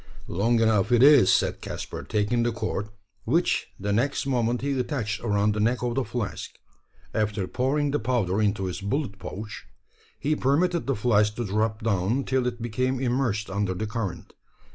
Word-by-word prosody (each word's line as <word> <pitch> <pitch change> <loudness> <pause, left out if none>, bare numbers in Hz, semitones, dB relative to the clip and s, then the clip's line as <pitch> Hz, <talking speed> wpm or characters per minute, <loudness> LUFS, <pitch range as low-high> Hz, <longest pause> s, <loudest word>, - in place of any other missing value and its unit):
"Long 115 +7 +1
enough, 110 -1 +2
it 120 0 +5
is," 140 -8 +7
said - - +1
Caspar, - - -6
taking 105 +2 0
the 120 0 +1
cord; 105 -2 -3 0.3
which 170 +3 +1
the 100 +1 -1
next 130 +7 0
moment 120 -3 0
he 140 -1 -1
attached 120 -6 -2
around 105 -2 +2
the 105 - -3
neck 120 +4 +1
of 120 -1 0
the 135 +2 0
flask. 115 -1 -5 0.6
After 105 -2 0
pouring 140 +5 0
the 145 - 0
powder 110 -4 0
into 100 -2 +1
his 90 0 -4
bullet 100 0 -2
pouch, 105 +1 -7 0.5
he 155 +2 0
permitted 165 +5 +1
the 135 - +1
flask 105 -1 +2
to 120 - -3
drop 110 +2 -1
down 110 +4 +1
till 130 -1 0
it 120 -1 -4
became 130 +3 -1
immersed 120 -5 0
under 100 -1 -1
the 110 - -3
current. 105 -4 -5
115 Hz, 175 wpm, -26 LUFS, 105-130 Hz, 0.6 s, is